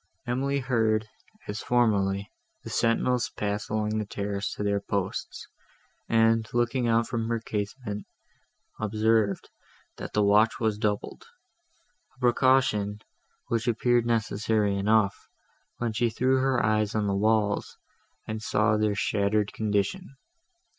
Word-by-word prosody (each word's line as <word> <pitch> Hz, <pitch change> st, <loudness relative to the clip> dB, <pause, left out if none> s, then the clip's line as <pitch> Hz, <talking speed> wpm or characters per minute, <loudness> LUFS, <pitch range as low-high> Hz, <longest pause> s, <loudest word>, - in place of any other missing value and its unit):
Emily 135 Hz, +3 st, -1 dB
heard, 110 Hz, -4 st, +1 dB, 0.4 s
as 105 Hz, +1 st, -4 dB
formerly, 100 Hz, -5 st, +1 dB, 0.3 s
the -, -, -8 dB
sentinels 120 Hz, +2 st, +1 dB
pass 105 Hz, 0 st, -3 dB
along 110 Hz, 0 st, -1 dB
the 105 Hz, -, -2 dB
terrace 100 Hz, 0 st, -3 dB
to -, -, -4 dB
their 100 Hz, 0 st, +1 dB
posts, 100 Hz, -2 st, -4 dB, 0.6 s
and, 115 Hz, -1 st, +3 dB
looking 120 Hz, +1 st, +1 dB
out 115 Hz, 0 st, +3 dB
from 115 Hz, -2 st, -2 dB
her 115 Hz, -1 st, 0 dB
casement, 105 Hz, 0 st, -5 dB, 0.7 s
observed, 110 Hz, -1 st, +1 dB, 0.5 s
that -, -, -7 dB
the 105 Hz, -, +2 dB
watch 105 Hz, +3 st, +4 dB
was 110 Hz, -2 st, 0 dB
doubled; 105 Hz, -2 st, -2 dB, 0.9 s
a -, -, -28 dB
precaution, 125 Hz, -5 st, +2 dB, 0.5 s
which 115 Hz, +1 st, -1 dB
appeared 120 Hz, 0 st, +2 dB
necessary 110 Hz, -2 st, +1 dB
enough, 100 Hz, 0 st, +1 dB, 0.5 s
when 120 Hz, -2 st, -2 dB
she 120 Hz, +2 st, +1 dB
threw 130 Hz, +4 st, +1 dB
her 130 Hz, -2 st, +1 dB
eyes 105 Hz, 0 st, +1 dB
on 105 Hz, -1 st, +1 dB
the 100 Hz, -, 0 dB
walls, 105 Hz, 0 st, +1 dB, 0.5 s
and 110 Hz, 0 st, -4 dB
saw 105 Hz, 0 st, +2 dB
their 105 Hz, -1 st, +1 dB
shattered 105 Hz, 0 st, 0 dB
condition. 110 Hz, -, -2 dB
110 Hz, 125 wpm, -27 LUFS, 105-120 Hz, 0.9 s, watch